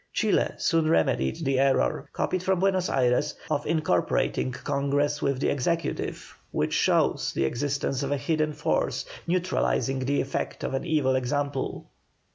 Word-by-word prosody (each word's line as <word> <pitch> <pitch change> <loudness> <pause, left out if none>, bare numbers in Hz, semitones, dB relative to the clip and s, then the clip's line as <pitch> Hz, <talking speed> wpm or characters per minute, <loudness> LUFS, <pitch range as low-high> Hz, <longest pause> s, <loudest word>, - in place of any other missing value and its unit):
Chile - - +1
soon 165 -3 +2
remedied 65 - +1
the 135 -1 +2
error, 135 0 +1
copied 185 - -1
from 190 0 +1
Buenos 190 -1 +1
Ayres, 130 +3 +1 0.2
of 145 -1 0
incorporating 150 - +1
Congress 140 +2 -1
with 140 -2 0
the - - +1
Executive, 165 +5 -2
which - - -1
shows - - +2
the 70 - +1
existence 135 - -1
of 140 0 -2
a 145 - +1
hidden 155 +1 0
force - - -1 0.2
neutralising 175 -6 0
the 135 +2 0
effect 135 - -3
of - - -2
an 135 - -2
evil 150 -6 +2
example. 140 +1 -2
145 Hz, 145 wpm, -26 LUFS, 135-160 Hz, 0.2 s, soon